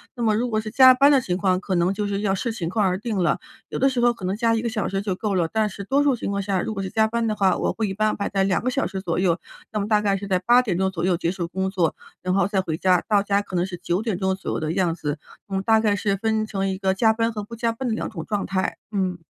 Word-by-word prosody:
那 240 - -3
么 215 -2 +3
如 245 +1 -1
果 215 -1 0
是 215 -1 -7
加 260 +1 +8
班 280 +3 +5
的 275 - +5
情 180 -7 -2
况， 185 -2 +1
可 190 -2 -2
能 175 +3 +2
就 205 0 -2
是 200 0 -2
要 195 -2 +1
视 225 +4 -2
情 170 -6 -3
况 210 +1 +1
而 185 0 +1
定 215 -1 -3
了。 175 -2 +1 0.3
有 - - -5
的 270 +1 +3
时 255 -2 -2
候 240 0 +4
可 210 - -14
能 185 +1 0
加 230 0 +2
1 225 - 0
个 235 - -1
小 220 -2 -2
时 195 0 -2
就 195 -3 -2
够 205 -1 -2
了， 165 -2 +1
但 220 -1 +1
是 200 0 -7
多 275 +7 +2
数 280 -3 +3
情 215 - -4
况 200 0 -1
下， 190 -2 -1
如 220 - -3
果 195 - -4
是 190 - -4
加 220 0 +2
班 230 0 -1
的 215 - 0
话， 195 -2 +2
我 - - -1
会 220 -3 -2
一 - - -3
般 215 +2 +1
安 - - -3
排 200 - -3
在 195 -1 +1
2 - - +1
个 255 - +1
小 275 +2 0
时 190 -2 -4
左 170 -3 -2
右。 175 -2 +2 0.3
那 215 - -2
么 200 - -2
大 210 -1 +3
概 200 -1 +1
是 200 +1 -7
在 185 -2 +2
8 240 +6 +5
点 190 -8 -2
钟 190 0 +1
左 170 -2 -4
右 180 -2 +2
结 170 0 -1
束 175 -3 -4
工 190 +2 -2
作， 175 -4 0 0.3
然 185 +1 -1
后 195 -2 +3
再 195 -2 0
回 160 -3 -3
家， 180 -1 +3
到 205 -1 +3
家 200 0 +1
可 190 -2 -8
能 175 +1 +1
是 180 -2 -6
9 180 +3 0
点 215 -6 -1
钟 190 0 +1
左 190 - -5
右 - - -2
的 155 +1 -2
样 180 -3 +1
子。 150 -2 -3 0.3
我 195 - -8
们 190 - -1
大 220 +1 +4
概 210 -2 +2
是 200 0 0
分 220 0 0
成 195 -2 -2
一 190 - -2
个 190 -1 +1
加 220 +3 +3
班 230 +1 0
和 210 -2 -5
不 230 +3 -9
加 230 0 0
班 250 +3 -4
的 220 - 0
两 - - -3
种 - - -6
状 205 -2 -2
态， 190 -1 -2
嗯。 185 -3 -1
200 Hz, 350 characters per minute, -23 LUFS, 185-220 Hz, 0.3 s, 加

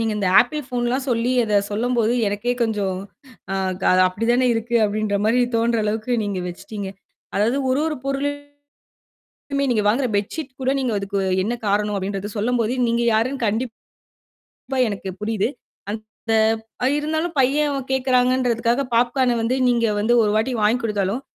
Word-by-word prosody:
நீங்க 225 -1 0
இந்த 200 -3 0
apple 295 +5 -1
phone 245 -2 -2
லாம் 260 +1 -1
சொல்லி 240 +1 +1
அத 210 -2 +2
சொல்லம்போது 235 +1 +1 0.2
எனக்கே 205 +5 -1
கொஞ்ச 220 -2 0 1.3
அப்டித்தானே 235 +6 +1
இருக்கு. 230 +1 -3
அப்டின்ற 210 -1 0
மாரி 235 +3 +3 0.2
தோன்ற 230 0 +1
அளவுக்கு 220 +3 -2
நீங்க 200 -2 -2
வெச்சிட்டீங்க. 200 +2 -6 0.5
அதாவது 220 +6 +2
ஒரு 265 - +2
ஒரு 310 -1 -2
பொருளும் 275 +1 -1 1.2
மே - - +2
நீங்க 215 -3 +1
வாங்குற 245 +4 +2
பெட்ஷீட் 260 +6 -3
கூட 260 +1 +1
நீங்க 255 -3 -1
அதுக்கு 195 0 -2 0.2
என்ன 230 +4 -1
காரணம் 205 +1 +1
அப்டின்றத 195 +1 -3
சொல்லம்போது 235 +2 0
நீங்க 235 +1 +1
யாருன்னு 245 +4 0
கண்டிப்பா 225 +3 -3 1.0
எனக்கு 195 -2 -4
புரியுது. 215 -1 0 0.4
அந்த 220 +1 -5 0.6
இருந்தாலும் 315 +2 -2
பையன் 275 0 +1
கேட்கிறாங்கன்றதுக்காக 250 -1 +2
பாப்கார்ன் 245 +1 +2
வந்து 235 +3 0
நீங்க 235 -1 +2
வந்து 225 +4 +2
ஒரு 210 - +1
வாட்டி 225 +4 +1
வாங்கிக் 220 +4 +2
குடுத்தாலும், 210 +1 -1
230 Hz, 140 wpm, -22 LUFS, 210-255 Hz, 1.3 s, மாரி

